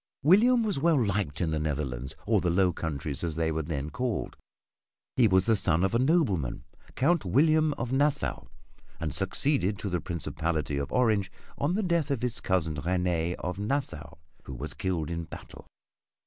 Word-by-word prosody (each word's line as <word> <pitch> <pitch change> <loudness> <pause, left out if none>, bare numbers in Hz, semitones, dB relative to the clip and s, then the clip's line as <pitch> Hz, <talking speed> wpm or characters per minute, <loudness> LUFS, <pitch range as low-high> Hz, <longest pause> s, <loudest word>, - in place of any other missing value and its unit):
William 230 - +5
was 205 -9 -1
well 160 -1 +3
liked 100 - -1
in 85 -3 0
the 80 - 0
Netherlands 70 -4 -3
or - - +2
the 90 - +1
"Low 90 +1 +3
Countries" 75 -3 -4
as 80 -3 -2
they 80 0 0
were 80 0 -1
then 75 -1 -4
called. 125 -4 -2 0.8
He 120 -3 +5
was 95 -2 +3
the 115 - +4
son 85 -4 +2
of 95 - +1
a 115 - +3
nobleman, 125 - +1 0.3
Count 170 +4 +2
William 155 - +3
of 120 -2 -4
Nassau, 145 +2 0 0.5
and 80 -4 -3
succeeded 130 -9 0
to 100 - -4
the 90 -2 -1
principality 80 -3 -2
of 70 0 -3
Orange 110 -6 +2 0.2
on 150 +6 0
the 215 - 0
death 170 -5 +1
of 135 -4 -1
his 125 -1 -2
cousin 90 -4 0
Réné 90 +1 0
of 90 +1 -5
Nassau 110 - -3 0.3
who 65 - -7
was 70 +6 -5
killed 85 -4 -2
in 85 0 -3
battle. - - -11
95 Hz, 175 wpm, -28 LUFS, 80-130 Hz, 0.8 s, William